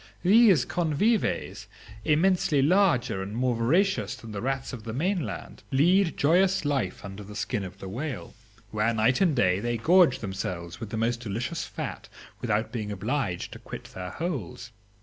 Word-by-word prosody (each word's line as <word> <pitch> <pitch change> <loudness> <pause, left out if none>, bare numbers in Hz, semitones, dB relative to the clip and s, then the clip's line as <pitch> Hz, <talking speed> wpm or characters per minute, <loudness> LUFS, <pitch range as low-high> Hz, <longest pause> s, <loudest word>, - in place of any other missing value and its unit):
These 195 - +6
convives 175 +7 0 0.4
immensely 165 -1 +3
larger 160 - +3
and 100 +3 -5
more 125 0 +1
voracious 125 - +1
than 115 - -10
the 100 -1 -5
rats 135 +1 -2
of 115 -3 -7
the 110 -1 -5
mainland, 175 - -3
lead 170 +6 +3
joyous 185 +4 +3
life 135 -13 -1
under 100 +1 -8
the 105 +1 -10
skin 110 -1 -2
of 95 0 -8
the 95 - -8
whale, 125 +6 -5 0.4
where 105 0 0
day 110 - 0 0.2
and 170 -7 +3
night 95 -5 +3
they 120 +1 -1
gorge 170 - +5
themselves 90 -4 -5
with 115 -3 -6
the 110 - -4
most 115 +1 0
delicious 120 +8 -3
fat - - -6 0.3
without 110 -2 -1
being 110 -4 -4
obliged 100 -1 -2
to - - -9
quit - - -8
their 90 -1 -6
holes. 120 - -5
125 Hz, 165 wpm, -27 LUFS, 105-170 Hz, 0.4 s, These